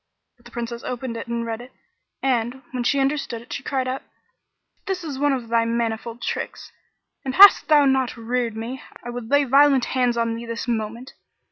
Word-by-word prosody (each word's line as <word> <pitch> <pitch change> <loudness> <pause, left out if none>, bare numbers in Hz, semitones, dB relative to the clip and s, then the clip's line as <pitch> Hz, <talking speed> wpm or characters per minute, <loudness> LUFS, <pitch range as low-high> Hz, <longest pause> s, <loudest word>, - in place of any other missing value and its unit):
But 240 -1 -29
the 240 - -13
Princess 235 0 -5
opened 250 -1 -4
it 230 - -6
and 235 0 -2
read 225 0 -4
it 250 - -12 0.5
and, 255 0 0
when 250 -2 -2
she 275 +3 +2
understood 275 -3 -1
it, 240 - -9
she - - -4
cried 265 -2 -2
out, 260 +1 -3 0.9
"This 375 -2 -2
is 285 -5 -5
one 290 0 +3
of 255 -4 -2
thy 230 0 +3
manifold 230 0 -2
tricks, - - -4 0.5
and 265 -1 -3
hadst 400 +1 +9
thou 295 -2 +6
not 265 -2 +1
reared 230 -1 -2
me, 240 +4 -5 0.2
I 240 - -5
would 240 -2 -6
lay 285 0 +4
violent 275 -1 +5
hands 250 -2 +2
on 230 -1 +1
thee 230 +1 -6
this 230 +1 -4
moment! 230 +2 -3
245 Hz, 200 wpm, -23 LUFS, 230-270 Hz, 0.9 s, hadst